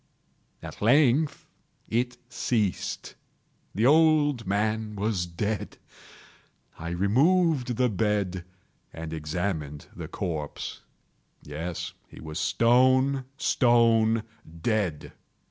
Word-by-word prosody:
At - - -9
length 140 +5 +3 0.4
it 125 +2 -1
ceased. 110 -5 -2 0.6
The 110 +4 +2
old 150 -5 +4
man 105 +2 -1
was 100 -3 -1
dead. 100 +5 -3 1.0
I 85 - -5
removed 130 - +2
the 125 - +3
bed 100 -3 -1 0.5
and 80 0 -7
examined 75 -2 -3
the - - -6
corpse. 75 -5 -5 0.6
Yes, 80 +4 -5
he - - -14
was 80 +2 -6
stone, 130 +6 +3
stone 115 -3 +3 0.4
dead. 100 -9 -1
110 Hz, 90 wpm, -27 LUFS, 90-125 Hz, 1.0 s, old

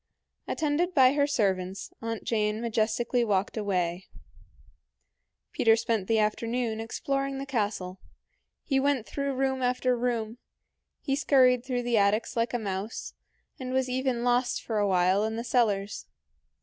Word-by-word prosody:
Attended 320 +4 0
by 260 -2 +6
her 285 0 +2
servants, 190 -7 -1
Aunt 225 -1 -4
Jane 215 -1 0
majestically 235 +1 0
walked 200 -3 0
away. 185 -4 -1 1.4
Peter 225 -5 +4
spent 225 -4 -1
the 225 - +2
afternoon 225 +2 0
exploring 275 +4 -2
the 275 - -4
castle. 205 -7 -2 0.6
He 270 -3 +1
went 275 -4 +1
through 280 +4 -3
room 265 0 0
after 250 0 +1
room; 235 -1 -2 0.6
he 270 - 0
scurried 255 -4 +4
through 250 -2 -2
the 240 -2 +2
attics 205 +3 +1
like 230 0 0
a - - +3
mouse, 205 0 -5 0.5
and 255 -1 -4
was 260 -1 +1
even 255 -1 -1
lost 245 +1 +1
for 220 -2 -1
a 205 - +2
while 185 +1 +3
in 220 +1 -2
the 230 - -3
cellars. 210 -5 0
235 Hz, 145 wpm, -28 LUFS, 210-260 Hz, 1.4 s, by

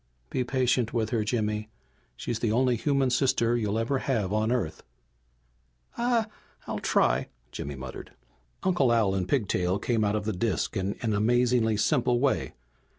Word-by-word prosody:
"Be 130 - 0
patient 125 -2 0
with 110 -1 0
her, 115 -3 +1
Jimmy. 105 -1 -1 0.5
She's 115 -2 -3
the 115 -2 0
only 125 +2 +3
human 135 +1 +1
sister 120 -2 +2
you'll 110 -2 0
ever 120 +4 0
have 110 -9 -1
on 110 +2 +1
Earth." 80 -11 -1 1.1
"I 240 -1 +1 0.4
I'll - - -3
try!" - - +2 0.2
Jimmy 70 0 -5
muttered. 65 -1 -8 0.5
Uncle 175 -10 +3
Al 110 -5 +3
and 95 -2 -2
Pigtail 95 -7 +1
came 110 +2 0
out 105 0 +1
of 105 -1 -2
the 110 - -1
disk 95 +2 -1
in 95 +1 -1
an 110 -2 +1
amazingly 120 +1 +2
simple 125 0 +2
way. 135 +1 0
115 Hz, 155 wpm, -27 LUFS, 105-125 Hz, 1.1 s, only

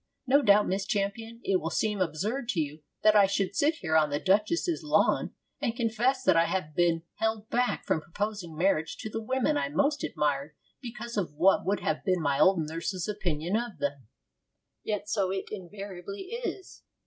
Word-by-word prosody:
'No 275 +3 +5
doubt, 205 -4 +5
Miss 195 +1 -1
Champion, 215 +3 -2
it 195 - +2
will 160 - -2
seem 210 +1 0
absurd 205 - -2
to 190 - 0
you 150 0 -3 0.2
that 215 0 +6
I 200 -2 +7
should 195 0 -1
sit 305 +3 +3
here 160 -2 0
on 155 -1 +4
the 145 0 -1
duchess's 215 - +1
lawn 305 - +2 0.3
and 230 - -1
confess 235 +3 +1
that 185 - +4
I 165 0 +5
have 170 -3 -2
been 170 -2 +2
held 220 -1 -1
back 245 +1 0
from 155 - +1
proposing 185 -1 -4
marriage 165 -2 +1
to 220 - -6
the 225 - -3
women 240 - +1
I 140 -1 -1
most 285 - +1
admired 145 0 -1 0.3
because 235 -2 -7
of 170 -7 -2
what 180 +3 +3
would 200 +1 +1
have - - -1
been 185 -2 +1
my 145 -3 0
old 175 -5 +4
nurse's 170 +3 -3
opinion 180 -4 -2
of 230 -5 -2
them.' 140 -4 -3 0.8
Yet 210 -1 -3
so 200 -3 0
it 190 0 -3
invariably 200 - -7
is. 470 -5 -5
195 Hz, 185 wpm, -28 LUFS, 165-225 Hz, 0.8 s, I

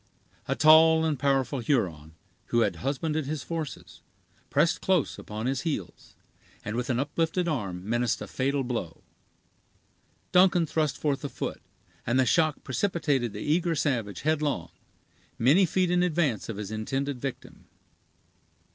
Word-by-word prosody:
A - - 0
tall 160 +1 +6
and 150 -4 -1
powerful 135 -1 +1
Huron, 85 - -1 0.3
who 120 - +2
had - - +1
husbanded 150 +2 -2
his 150 -1 -3
forces, 165 -4 -6 0.5
pressed - - +2
close - - +1
upon 110 +2 -6
his 135 0 0
heels, 145 - -5 0.5
and 105 - -3
with 125 +1 -2
an 125 -1 +1
uplifted 165 +5 -1
arm 100 - -3
menaced 120 +1 0
a - - -5
fatal 135 +1 -1
blow. 115 -10 -4 1.3
Duncan 180 -2 +5
thrust 155 -3 -1
forth 145 -2 -1
a 145 - -3
foot, - - -5 0.4
and 120 +3 +1
the 130 - +4
shock 155 +3 +2
precipitated 140 - 0
the - - -7
eager 165 +2 +1
savage 115 - -1
headlong, 145 - -1 0.7
many 155 +11 +4
feet 180 +1 +1
in 180 0 +3
advance 160 -11 0
of 110 - -4
his 105 0 -5
intended 135 +5 -3
victim. 135 -2 -7
140 Hz, 145 wpm, -27 LUFS, 120-160 Hz, 1.3 s, tall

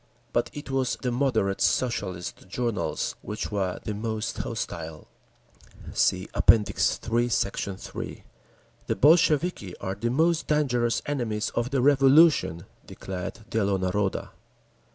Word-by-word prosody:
But 120 - +1
it 145 -2 -8
was 130 -2 0
the 125 - 0
"moderate" 120 -7 0
Socialist 95 -9 -1
journals 120 +2 -2
which 105 +1 -5
were 95 -3 -1
the 105 - -3
most 110 +1 -3
hostile. 85 -10 -5 0.9
(See 95 +1 +1
App. - - -2
III, 115 +2 +3
Sect. 100 -2 0 0.2
3) - - -7 0.6
"The - - 0
Bolsheviki 150 - +3
are 95 - -4
the 115 +5 -2
most 160 +6 +2
dangerous 125 -6 +1
enemies 120 -7 -2
of 120 +1 -1
the 135 -2 0
Revolution," 140 - +5 0.2
declared 95 +3 -6
_Dielo 100 -3 +1
Naroda. 95 +2 -1
115 Hz, 120 wpm, -26 LUFS, 100-135 Hz, 0.9 s, Revolution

